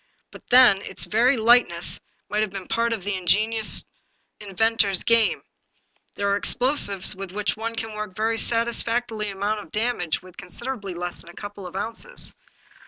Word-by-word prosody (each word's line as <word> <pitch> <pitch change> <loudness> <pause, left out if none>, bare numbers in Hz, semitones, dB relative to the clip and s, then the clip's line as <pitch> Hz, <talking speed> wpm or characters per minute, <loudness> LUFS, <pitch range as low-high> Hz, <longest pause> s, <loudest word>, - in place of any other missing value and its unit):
But - - -15
then 245 -6 +6
its - - -5
very 245 +5 +2
lightness 225 -7 +3 0.3
might 210 +1 -1
have 215 - 0
been 190 -1 -8
part 230 0 0
of 220 -5 -3
the 205 +1 -2
in 185 -1 -5
genious 220 +4 +2 0.5
inventor's 205 -1 0
little 230 - +7
game. 225 -2 +1 0.7
There 200 - -2
are - - +3
explosives 205 -7 +2
with 195 -1 -7
which 205 +1 -1
one 230 +1 -5
can 225 -1 -4
work 215 0 -5
a - - -23
very 225 +2 0
satisfactory 230 -1 +1
amount 200 +2 -2
of 205 - -12
damage 215 -8 -2
with 185 -1 -16
considerably 205 -1 -5
less 175 0 -2
than 170 - -12
a 175 - -14
couple 205 -2 -8
of 180 - -12
ounces. 230 - -3
215 Hz, 175 wpm, -23 LUFS, 195-230 Hz, 0.7 s, little